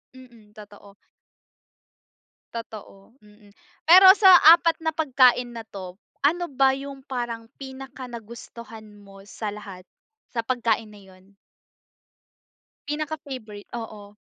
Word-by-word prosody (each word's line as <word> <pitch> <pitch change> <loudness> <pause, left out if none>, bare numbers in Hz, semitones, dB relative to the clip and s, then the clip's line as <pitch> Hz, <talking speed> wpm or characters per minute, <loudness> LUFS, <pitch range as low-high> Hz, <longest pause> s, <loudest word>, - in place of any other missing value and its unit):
Mm, 235 -5 -18
totoo. 205 -1 -15 1.6
Totoo, 225 0 -11
mhm. 210 0 -21 0.3
Pero 365 +4 +8
sa 380 -4 +7 0.2
apat 335 -1 -1
na 320 -1 -3
pagkain 250 -5 +2
na 230 -2 -10
to, 185 -1 -10 0.2
ano 345 +5 +1
ba 270 -2 +2
yung 275 0 -8
parang 240 -3 -6
pinaka-nagustuhan 235 -4 -11 0.2
mo 195 0 -16
sa 210 0 -6
lahat? 200 -3 -11 0.5
Sa 240 - -4
pagkain 230 -3 -1
na 210 -1 -15
yun? 190 +1 -21 1.5
Pinaka-favourite, 285 -9 -7
oo. 210 -3 -9
235 Hz, 105 wpm, -23 LUFS, 210-270 Hz, 1.6 s, Pero